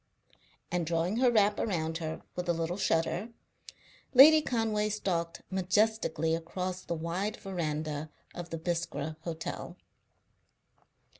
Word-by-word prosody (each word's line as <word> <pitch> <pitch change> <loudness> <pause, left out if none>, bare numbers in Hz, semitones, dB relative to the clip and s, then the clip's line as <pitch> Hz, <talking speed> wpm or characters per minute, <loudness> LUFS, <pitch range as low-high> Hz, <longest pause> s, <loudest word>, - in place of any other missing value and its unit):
And, 175 0 0
drawing 170 +5 0
her 250 0 +5
wrap 210 -3 +3
around 165 -5 -1
her 160 -1 -5
with 180 0 -3
a - - +4
little 165 +1 -2
shudder, 175 +2 0 0.9
Lady 310 +4 +10
Conway 220 -5 0
stalked 175 -5 -2
majestically 185 -3 +1
across 180 +3 -3
the 170 - -3
wide 170 +6 -2
verandah 155 -5 -3 0.2
of 175 -1 -7
the 165 - -4
Biskra 160 -3 -3
Hotel. 165 -1 -5
175 Hz, 120 wpm, -30 LUFS, 165-205 Hz, 0.9 s, Lady